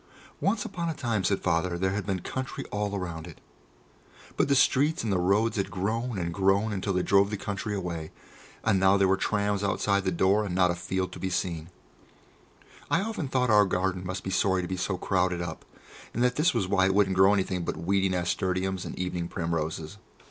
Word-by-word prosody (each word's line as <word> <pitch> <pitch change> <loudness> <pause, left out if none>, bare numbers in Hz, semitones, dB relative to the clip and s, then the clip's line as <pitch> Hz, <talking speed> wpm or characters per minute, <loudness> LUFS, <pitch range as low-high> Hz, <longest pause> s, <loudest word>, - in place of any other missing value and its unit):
Once 220 +4 0
upon 175 -6 -3
a 160 - -3
time, 115 -8 -1
said 95 +2 +1
Father, 85 0 0
there 95 +1 0
had 100 0 -3
been 95 -2 -1
country 130 +7 -5
all 105 -1 -1
round 85 -3 -5
it, 85 - -12 1.0
but - - +2
the 140 - +3
streets 145 +3 +3
and 110 -3 0
the 90 - +1
roads 105 +6 +2
had 100 -1 -1
grown 110 +5 -2
and 85 -2 -2
grown 100 +3 +2
until 100 0 -2
they 90 0 +1
drove 100 0 +4
the 105 - -3
country 105 +1 -3
away, 85 -5 -4 0.5
and 95 - +3
now 95 +1 +5
there 100 -1 +3
were 95 - +4
trams 100 0 0
outside 100 0 +1
the 95 - 0
door, 95 +4 +3
and 95 -4 -3
not 90 -1 +4
a - - -2
field 95 +1 -2
to - - -9
be 95 - -2
seen. 85 -3 -2 1.2
I - - +2
often 215 -8 -3
thought 130 -2 +1
that - - +4
our 105 -1 +6
garden 90 0 -1
must 95 0 -4
be 95 - -4
sorry 95 -1 +2
to - - -4
be 95 - -3
so 90 +1 -2
crowded 90 -1 0
up, 85 -2 -6 0.5
and 120 - +1
that 125 0 +2
this 165 +4 +3
was 95 - -1
why 95 0 +3
it 95 - +1
wouldn't 100 -2 +3
grow 95 +2 +6
anything 95 -3 0
but - - -3
weedy 95 +2 +1
nasturtiums 95 +1 -1
and - - -7
evening 90 -2 -2
primroses. 80 +1 -3
95 Hz, 215 wpm, -27 LUFS, 90-105 Hz, 1.2 s, our